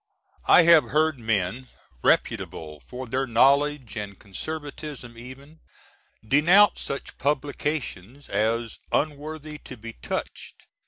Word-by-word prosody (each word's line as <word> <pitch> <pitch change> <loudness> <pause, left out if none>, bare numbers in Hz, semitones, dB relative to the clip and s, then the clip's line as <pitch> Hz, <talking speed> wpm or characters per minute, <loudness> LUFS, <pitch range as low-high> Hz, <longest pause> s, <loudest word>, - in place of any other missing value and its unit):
I 180 - +8
have 165 -2 +7
heard 155 -2 +1
men, 110 +2 -1 0.4
reputable 75 -2 0
for 130 - -8
their 130 +3 -1
knowledge 140 +2 +3 0.2
& 100 - -18
conservatism 145 +2 -7
even, 135 +6 -12 0.7
denounce 175 - +5
such 140 - -5
Publi^ns. 145 - -2
as 115 +3 -1
"unworthy 150 0 -2
to 125 - -10
be 115 +1 -9
touched." - - -6
135 Hz, 105 wpm, -25 LUFS, 115-150 Hz, 0.7 s, I